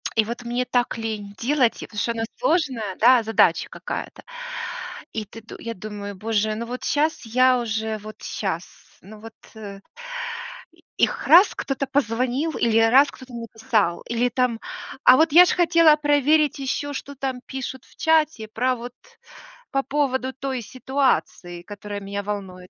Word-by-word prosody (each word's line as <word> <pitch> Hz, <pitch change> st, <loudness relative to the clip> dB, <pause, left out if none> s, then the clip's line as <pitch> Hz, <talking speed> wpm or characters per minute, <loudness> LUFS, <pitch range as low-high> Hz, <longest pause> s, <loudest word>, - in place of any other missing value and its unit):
и 220 Hz, -, +3 dB
вот 235 Hz, +2 st, -6 dB
мне 240 Hz, +1 st, -1 dB
так 245 Hz, -1 st, 0 dB
лень 215 Hz, -3 st, -5 dB
делать, 255 Hz, 0 st, +1 dB
потому 210 Hz, -, -6 dB
что 235 Hz, -, 0 dB
оно 230 Hz, -1 st, -3 dB, 0.2 s
сложное, 270 Hz, -, 0 dB
да, 245 Hz, +1 st, +6 dB
задача 200 Hz, -6 st, +2 dB
какая-то. -, -, -6 dB, 0.9 s
И 220 Hz, -1 st, -3 dB
ты 225 Hz, +3 st, -12 dB
д 220 Hz, -, -11 dB
я 230 Hz, 0 st, -5 dB
думаю: 205 Hz, +1 st, -7 dB
"Боже, 215 Hz, +1 st, -1 dB
ну 230 Hz, +2 st, -4 dB
вот 250 Hz, +2 st, -6 dB
щас 300 Hz, 0 st, 0 dB
я 255 Hz, +2 st, +4 dB
уже, 220 Hz, -1 st, -2 dB
вот 215 Hz, +1 st, -11 dB
щас, 185 Hz, -4 st, -3 dB, 0.4 s
ну 210 Hz, +3 st, -13 dB
вот, 225 Hz, +1 st, -11 dB, 0.2 s
э". 200 Hz, -2 st, -9 dB, 1.0 s
И -, -, -26 dB
их -, -, +1 dB
раз 355 Hz, +6 st, +7 dB
кто-то 275 Hz, 0 st, -3 dB
позвонил, 260 Hz, +3 st, 0 dB
или 225 Hz, -1 st, +3 dB
раз 255 Hz, +6 st, +6 dB
кто-то 255 Hz, -1 st, -13 dB
написал, 225 Hz, -5 st, -1 dB
или 235 Hz, +1 st, +1 dB
там, 245 Hz, -2 st, 0 dB, 0.4 s
а 255 Hz, -, +8 dB
вот 320 Hz, +2 st, +4 dB
я 350 Hz, +3 st, +10 dB
ж 360 Hz, -, 0 dB
хотела 335 Hz, -3 st, +5 dB
проверить 295 Hz, 0 st, +2 dB
еще, 275 Hz, +2 st, -2 dB
что 285 Hz, 0 st, -6 dB
там 265 Hz, -1 st, -3 dB
пишут 260 Hz, -1 st, -6 dB
в -, -, -22 dB
чате 315 Hz, -8 st, +2 dB
про 250 Hz, +4 st, 0 dB
вот 245 Hz, +1 st, -8 dB, 0.8 s
по 275 Hz, 0 st, 0 dB
поводу 265 Hz, -3 st, -1 dB
той 265 Hz, -1 st, -4 dB
ситуации, 255 Hz, -8 st, -1 dB
которая 205 Hz, +1 st, -7 dB
меня 200 Hz, +1 st, -4 dB
волнует. 190 Hz, -3 st, -6 dB
240 Hz, 160 wpm, -23 LUFS, 215-270 Hz, 1.0 s, я